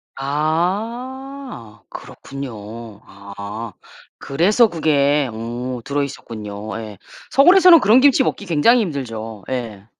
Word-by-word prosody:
아. 190 - -3
그렇군요. 115 -5 -9
아. 100 +2 -9 0.4
그래서 200 - +2
그게 145 -4 +1
어 120 +3 -5
들어있었군요. 110 -7 -5
예. 105 -2 -9 0.3
서울에서는 355 +3 +7
그런 220 +5 +5
김치 270 -1 +5
먹기 205 - -3
굉장히 205 +9 +3
힘들죠. 115 - -5
예. 115 -6 -5
140 Hz, 220 characters per minute, -19 LUFS, -, 0.4 s, 서울에서는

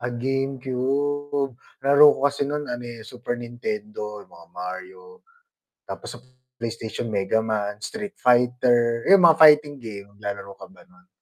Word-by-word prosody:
Ah, 120 - -3
GameCube, 135 +2 -2 0.3
nalaro 145 +2 +7
ko - - -8
kasi 140 0 -1
nun 150 0 -3
ano, 120 0 -5
eh, 115 -2 -9
Super 120 +1 -5
Nintendo, 120 - -6
yung - - -28
mga 85 -1 -16
Mario, 445 - -9 0.7
tapos - - -7
sa - - -16 0.4
PlayStation 115 0 -5
Megaman, 105 0 -1
Street 210 - -7
Fighter, 120 -1 +2
yun 195 -1 +7
mga 165 -2 +6
fighting 150 -2 +6
game 100 -4 -9
naglalaro 100 -1 -6
ka - - -10
ba 190 - -19
nun? 190 +2 -25
125 Hz, 145 wpm, -23 LUFS, 115-145 Hz, 0.7 s, nalaro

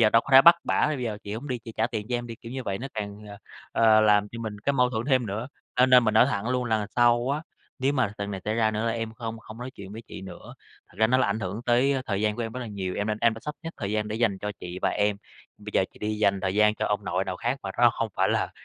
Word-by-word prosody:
giờ 110 -2 +5
đâu 115 +1 +5
có - - -13
thể 135 +1 +10
bắt 170 - +9
bả - - 0
là: - - +4
"Bây 150 -4 -2
giờ 105 -3 -3
chị 100 - -5
hổng 135 +6 -6
đi, 125 - -2
chị 115 0 -10
trả 110 - +2
tiền 110 -3 -5
cho 125 - -1
em 120 0 -5
đi!", 115 - -7
kiểu 115 - -10
như 130 0 -4
vậy 100 -3 -3
nó 135 - -5
càng, 100 -1 -5
ờ, 100 - -9 0.4
ờ, 110 -1 +5
làm 105 -1 +4
cho 115 - -7
mình 110 -2 -5
cái 140 - 0
mâu 125 -2 +2
thuẫn 115 -2 -2
thêm 130 -4 +2
nữa. 110 +6 -4 0.3
Cho 125 +1 +5
nên 125 -1 +6
mình 110 -1 +1
nói 110 - +6
thẳng 100 +4 -2
luôn: 125 0 0
"Lần 110 -3 0
sau 120 +1 +4
á 150 +3 -1 0.4
nếu 135 +2 +1
mà 120 -7 0
lần 100 0 -3
này 95 - -5
xảy 105 - -1
ra 110 -1 +2
nữa 110 +2 -2
là 115 - +1
em 115 -1 -4
không 115 -1 -6
không 110 0 -12
nói 125 +2 -6
chuyện 100 -6 -11
với 115 - -8
chị - - -8
nữa. 95 -2 -10 0.3
Thật - - -22
ra 110 - +5
nó 130 +3 +3
là 125 - +3
ảnh 100 +2 -1
hưởng 100 +4 -4
tới 125 +3 +3
thời 100 -2 -1
gian 105 0 +1
của 120 - -2
em 115 - -4
rất 125 - -5
là 120 - -5
nhiều, 95 -4 -4
em 105 - -1
nên 110 0 -1
em 115 -1 +3
đã 115 - -10
sắp 150 - -4
xếp 165 - -5
thời 100 -4 -4
gian 105 0 -1
để 110 - -3
dành 110 -4 +1
cho 105 +2 -4
chị 90 +1 -6
và - - +3
em, 105 0 +1 0.4
bây - - -8
giờ - - +3
chị - - -18
đi 105 0 -3
dành 100 -2 +2
thời 95 0 -1
gian 105 +1 +4
cho 110 - -2
ông 105 0 -1
nội 95 +1 -1
nào 95 -1 -4
khác 120 +7 -2
mà 95 - -4
nó 120 0 +6
không 115 -1 -3
phải - - +2
là - - 0
110 Hz, 330 wpm, -26 LUFS, 105-120 Hz, 0.4 s, thể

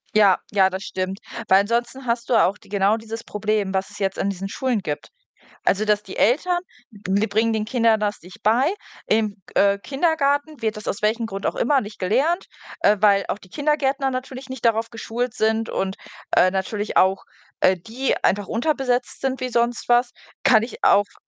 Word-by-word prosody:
Ja, 200 -3 +5
ja, 190 -2 +4
das 190 +1 -5
stimmt. 190 +2 -4 0.3
Weil 190 +1 +6
ansonsten 240 +5 -2
hast 235 0 -2
du 240 - +3
auch 200 -1 +3
d - - -21
genau 200 +2 +2
dieses 225 +1 -7
Problem, 210 -2 -1
was 190 0 -1
es - - -12
jetzt 195 -1 -1
an 200 - 0
diesen 195 0 -4
Schulen 250 -1 -1
gibt. 150 -6 -5 0.6
Also 200 +2 +2
dass 210 -1 +2
die 190 - -10
Eltern, 350 - +2 0.3
die 200 0 -1
bringen 220 +3 +1
den 215 -1 -1
Kindern 230 -2 +2
das 210 -1 -2
nicht 180 +2 -14
bei. 250 - +3 0.3
Im, 215 -2 +1
g - - -18
äh, 200 0 +4
Kindergarten 285 - 0
wird 220 -1 -1
das 215 - -9
aus 200 - -2
welchen 225 +2 +1
Grund 195 -2 -6
auch - - 0
immer 270 +2 +2
nicht 210 -1 -9
gelernt, 270 - +1 0.3
äh, 210 - +4
weil 200 -2 +4
auch - - -2
die 190 -3 -18
Kindergärtner 280 -1 0
natürlich 255 +1 -6
nicht 260 -2 -7
darauf 230 -1 +2
geschult 235 +1 -3
sind 220 +1 0
und, 190 0 -2 0.4
äh, 185 - +5
natürlich 200 +2 -3
auch, 190 +1 +3 0.4
äh, 185 - +4
die 230 +9 -2
einfach 200 0 +1
unterbesetzt 250 0 -1
sind 265 0 -2
wie 255 - -2
sonst 235 0 0
was, 240 0 +4 0.3
kann 230 -5 +5
ich 230 - -8
auf 205 0 +4
220 Hz, 195 wpm, -22 LUFS, 200-250 Hz, 0.6 s, Weil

